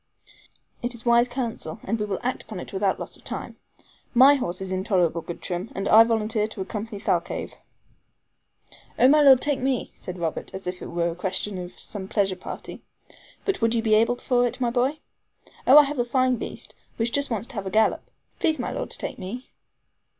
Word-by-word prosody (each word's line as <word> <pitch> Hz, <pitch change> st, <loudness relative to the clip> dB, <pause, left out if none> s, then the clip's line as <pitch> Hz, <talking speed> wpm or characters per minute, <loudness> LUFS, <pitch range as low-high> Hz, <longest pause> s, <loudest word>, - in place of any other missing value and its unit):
"It 240 Hz, 0 st, -2 dB
is 235 Hz, -, -9 dB
wise 235 Hz, 0 st, +5 dB
counsel, 240 Hz, -3 st, -4 dB
and 225 Hz, +3 st, -2 dB
we 210 Hz, -, -1 dB
will 195 Hz, -2 st, -2 dB
act 250 Hz, +1 st, -1 dB
upon 215 Hz, -4 st, -8 dB
it -, -, -9 dB
without 195 Hz, 0 st, 0 dB
loss -, -, -6 dB
of -, -, -21 dB
time. -, -, -6 dB, 0.6 s
My 265 Hz, +4 st, +8 dB
horse 185 Hz, -10 st, -2 dB
is 190 Hz, -1 st, -5 dB
in 185 Hz, 0 st, -1 dB
tolerable 175 Hz, -5 st, +1 dB
good 170 Hz, -, -8 dB
trim, 180 Hz, +3 st, -3 dB
and 195 Hz, -, -2 dB
I 220 Hz, +1 st, +8 dB
volunteer 220 Hz, -1 st, 0 dB
to 215 Hz, -3 st, -8 dB
accompany 210 Hz, +2 st, -5 dB
Thalcave." -, -, -1 dB, 1.4 s
"Oh, 255 Hz, -, +6 dB
my 300 Hz, +3 st, +6 dB
Lord, 270 Hz, -3 st, +7 dB
take 290 Hz, -2 st, 0 dB
me," 260 Hz, -1 st, -1 dB
said 180 Hz, 0 st, -7 dB
Robert, 165 Hz, +1 st, -4 dB
as 190 Hz, -, -7 dB
if 180 Hz, 0 st, -4 dB
it -, -, -6 dB
were 170 Hz, 0 st, 0 dB
a -, -, -7 dB
question 190 Hz, +2 st, -2 dB
of 175 Hz, 0 st, -8 dB
some 195 Hz, -3 st, -7 dB
pleasure 195 Hz, -2 st, +1 dB
party. -, -, -8 dB, 0.6 s
"But 395 Hz, -8 st, -1 dB
would 230 Hz, +1 st, +2 dB
you 225 Hz, -, +1 dB
be 220 Hz, -2 st, +2 dB
able 230 Hz, +3 st, +4 dB
for 245 Hz, 0 st, +1 dB
it, 245 Hz, +2 st, -6 dB
my 240 Hz, -2 st, +1 dB
boy?" 260 Hz, +5 st, +1 dB, 0.7 s
"Oh, 270 Hz, -, +9 dB
I 300 Hz, -, +10 dB
have 285 Hz, -1 st, -3 dB
a -, -, +3 dB
fine 255 Hz, +1 st, +1 dB
beast, -, -, -7 dB, 0.2 s
which 230 Hz, +1 st, 0 dB
just 285 Hz, +2 st, +1 dB
wants 225 Hz, -3 st, -2 dB
to -, -, -10 dB
have 200 Hz, -4 st, -4 dB
a -, -, -1 dB
gallop. 220 Hz, +3 st, +1 dB, 0.3 s
Please, 315 Hz, -1 st, +2 dB
my 245 Hz, -, -3 dB
Lord, -, -, -4 dB
to -, -, -1 dB
take -, -, -5 dB
me." 210 Hz, +7 st, -7 dB
225 Hz, 215 wpm, -25 LUFS, 190-250 Hz, 1.4 s, I